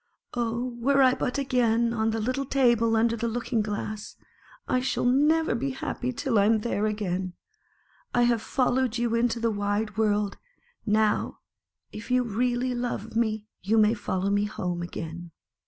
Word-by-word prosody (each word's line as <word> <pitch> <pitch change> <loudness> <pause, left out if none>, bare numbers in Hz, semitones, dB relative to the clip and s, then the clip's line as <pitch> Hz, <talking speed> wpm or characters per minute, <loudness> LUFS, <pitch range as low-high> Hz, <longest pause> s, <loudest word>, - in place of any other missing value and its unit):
Oh, 240 +1 -2
were 275 +3 +4
I 255 -1 +5
but 255 - -2
again 235 -4 +2
on 220 -1 +1
the 225 0 -1
little 255 +5 -1
table 235 -4 +3
under 230 +1 +2
the 235 +1 -2
looking 230 0 -1
glass! 210 0 -5 0.5
I 255 - +2
shall 255 0 -1
never 300 +6 +3
be 255 +4 -1
happy 255 -1 -3
till 240 -2 0
I 200 - +4
am 220 0 +3
there 215 -2 0
again. 190 -4 -2 0.8
I 240 - +3
have 240 -2 +2
follow 260 +1 +1
ed 245 -1 -3
you 235 -1 0
into 235 0 +1
the 230 0 +1
wide 205 +1 -2
world; 210 -2 +1 0.5
now 215 0 +1 0.5
if 215 +3 -9
you 250 0 +3
really 245 +3 0
love 240 -3 -4
me, 220 -2 0 0.2
you 210 +5 +1
may 215 0 +5
follow 200 -3 -2
me 205 0 +2
home 180 -4 -3
again." 170 0 -6
230 Hz, 170 wpm, -26 LUFS, 210-245 Hz, 0.8 s, I